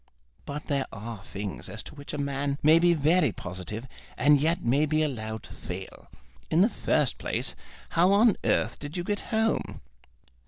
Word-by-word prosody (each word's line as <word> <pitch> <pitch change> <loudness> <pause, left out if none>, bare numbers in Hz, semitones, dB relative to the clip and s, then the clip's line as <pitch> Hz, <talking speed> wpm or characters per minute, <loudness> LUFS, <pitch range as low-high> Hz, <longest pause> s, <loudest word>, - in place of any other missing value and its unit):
"But 150 +1 -5
there 140 -2 -1
are 110 -1 -7
things 100 -1 -6
as 110 - -5
to - - -11
which 145 -1 -8
a - - -4
man 140 0 -1
may 155 +2 +7
be 175 0 +4
very 155 -1 +3
positive, 95 +7 -6 0.3
and 145 +1 +5
yet 165 +3 +1
may 140 +6 +3
be 155 +1 +2
allowed 110 -6 -3
to - - -12
fail. - - -8 0.4
In 160 +2 +4
the 210 - +5
first - - 0
place, - - -1 0.4
how 175 +3 +4
on 210 +1 +5
earth - - +1
did 145 +4 -6
you 175 - -1
get 205 +2 -1
home?" 220 0 0
145 Hz, 180 wpm, -28 LUFS, 120-170 Hz, 0.4 s, may